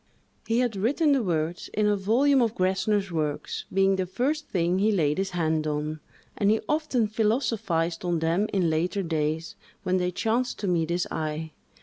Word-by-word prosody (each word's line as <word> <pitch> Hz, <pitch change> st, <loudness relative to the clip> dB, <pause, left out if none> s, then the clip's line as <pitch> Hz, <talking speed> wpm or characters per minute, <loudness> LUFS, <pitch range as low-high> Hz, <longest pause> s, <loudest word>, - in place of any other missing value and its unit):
He 230 Hz, +2 st, +2 dB
had 240 Hz, -4 st, 0 dB
written 280 Hz, -, +2 dB
the 275 Hz, -2 st, +3 dB
words 170 Hz, -3 st, -2 dB
in 215 Hz, -, +2 dB
a 210 Hz, 0 st, +3 dB
volume 250 Hz, +8 st, +3 dB
of 230 Hz, -2 st, +1 dB
Gessner's 190 Hz, +1 st, +1 dB
works, 155 Hz, -3 st, -3 dB
being 195 Hz, 0 st, +3 dB
the 185 Hz, -1 st, -1 dB
first 285 Hz, -, -1 dB
thing 175 Hz, 0 st, 0 dB
he 215 Hz, +2 st, +3 dB
laid 155 Hz, -5 st, +1 dB
his 195 Hz, 0 st, 0 dB
hand 160 Hz, -3 st, 0 dB
on; 150 Hz, +1 st, -2 dB, 0.4 s
and 200 Hz, -, +2 dB
he 220 Hz, +1 st, +3 dB
often 300 Hz, -6 st, +1 dB
philosophized 210 Hz, -7 st, 0 dB
on 175 Hz, -1 st, 0 dB
them 165 Hz, +6 st, +1 dB
in 180 Hz, -4 st, +1 dB
later 175 Hz, +5 st, 0 dB
days, 160 Hz, -1 st, -2 dB, 0.3 s
when 185 Hz, 0 st, +1 dB
they 180 Hz, -1 st, 0 dB
chanced 230 Hz, +7 st, -1 dB
to 205 Hz, -, -3 dB
meet 170 Hz, -3 st, +1 dB
his 175 Hz, +1 st, 0 dB
eye. 155 Hz, 0 st, -3 dB
190 Hz, 185 wpm, -26 LUFS, 165-220 Hz, 0.4 s, the